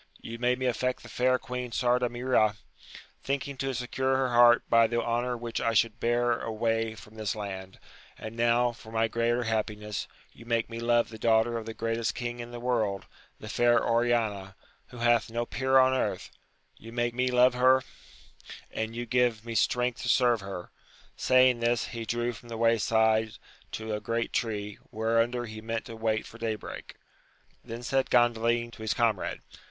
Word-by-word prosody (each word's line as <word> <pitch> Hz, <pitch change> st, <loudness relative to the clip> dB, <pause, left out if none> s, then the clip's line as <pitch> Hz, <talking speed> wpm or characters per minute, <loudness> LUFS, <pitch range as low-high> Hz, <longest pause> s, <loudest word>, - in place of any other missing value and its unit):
You 115 Hz, 0 st, -8 dB
made 125 Hz, +1 st, +2 dB
me 130 Hz, -, -3 dB
aflfect 125 Hz, +1 st, -1 dB
the -, -, -12 dB
fair 130 Hz, +1 st, +2 dB
Queen 125 Hz, -1 st, -5 dB
Sardamira, 120 Hz, -3 st, +1 dB, 0.7 s
thinking 140 Hz, 0 st, -2 dB
to 135 Hz, 0 st, -2 dB
secure 130 Hz, +2 st, 0 dB
her 130 Hz, -1 st, +1 dB
heart 120 Hz, 0 st, +6 dB
by 115 Hz, -1 st, +5 dB
the 120 Hz, +1 st, -1 dB
honour 120 Hz, +1 st, -1 dB
which 120 Hz, 0 st, -4 dB
I 115 Hz, -, +1 dB
should 115 Hz, +1 st, +2 dB
bear 120 Hz, 0 st, +1 dB
away 115 Hz, 0 st, -1 dB
from 105 Hz, -, -14 dB
this 110 Hz, -3 st, -3 dB
land; 95 Hz, -2 st, -6 dB, 0.4 s
and 110 Hz, +1 st, -8 dB
now, 120 Hz, +1 st, +3 dB
for 110 Hz, -1 st, -14 dB
my 115 Hz, 0 st, +1 dB
greater 115 Hz, +2 st, 0 dB
happiness, 105 Hz, -3 st, -3 dB, 0.3 s
you -, -, -14 dB
make 115 Hz, -1 st, 0 dB
me 115 Hz, -, -5 dB
love 120 Hz, 0 st, +2 dB
the 110 Hz, -, -10 dB
daughter 115 Hz, +1 st, +3 dB
of 115 Hz, -1 st, -4 dB
the 115 Hz, -, -6 dB
greatest 115 Hz, -3 st, -1 dB
king 120 Hz, 0 st, -4 dB
in 120 Hz, 0 st, -6 dB
the 120 Hz, 0 st, -7 dB
world, 110 Hz, -6 st, -1 dB, 0.3 s
the 110 Hz, -, -9 dB
fair 120 Hz, +1 st, +3 dB
Oriana, 115 Hz, -5 st, 0 dB, 0.3 s
who 125 Hz, -, -12 dB
hath 120 Hz, -1 st, +2 dB
no 120 Hz, +1 st, -2 dB
peer 130 Hz, +2 st, +1 dB
on 130 Hz, 0 st, +5 dB
earth: 130 Hz, -, -2 dB, 0.5 s
you 115 Hz, -, -11 dB
make 120 Hz, 0 st, -1 dB
me 125 Hz, +1 st, 0 dB
love 125 Hz, 0 st, +5 dB
her, 130 Hz, +1 st, +4 dB, 0.9 s
and 110 Hz, +1 st, -4 dB
you 120 Hz, 0 st, -3 dB
give 120 Hz, -2 st, +1 dB
me 115 Hz, -, -5 dB
strength 125 Hz, +1 st, +1 dB
to -, -, -3 dB
serve 120 Hz, -4 st, +3 dB
her. 95 Hz, -2 st, -7 dB, 0.4 s
Saying 130 Hz, -1 st, +4 dB
this, 120 Hz, 0 st, 0 dB
he 115 Hz, -1 st, -5 dB
drew 120 Hz, +2 st, -1 dB
from 120 Hz, +1 st, -13 dB
the 115 Hz, -, -5 dB
way 115 Hz, 0 st, +3 dB
side 110 Hz, 0 st, +2 dB, 0.4 s
to 110 Hz, 0 st, -4 dB
a 105 Hz, -, -2 dB
great 115 Hz, 0 st, -2 dB
tree, 105 Hz, -3 st, -2 dB
whereunder 115 Hz, +2 st, 0 dB
he 110 Hz, -1 st, -8 dB
meant 115 Hz, 0 st, -4 dB
to 115 Hz, -, -8 dB
wait 110 Hz, -1 st, -1 dB
for 115 Hz, -, -13 dB
day 115 Hz, -1 st, -1 dB
break 105 Hz, -, -9 dB, 0.7 s
Then 115 Hz, +1 st, -7 dB
said 130 Hz, 0 st, 0 dB
Gandalin 120 Hz, -1 st, +2 dB
to 110 Hz, -, -13 dB
his 110 Hz, -1 st, -1 dB
comrade. 115 Hz, -5 st, 0 dB
115 Hz, 185 wpm, -28 LUFS, 110-120 Hz, 0.9 s, heart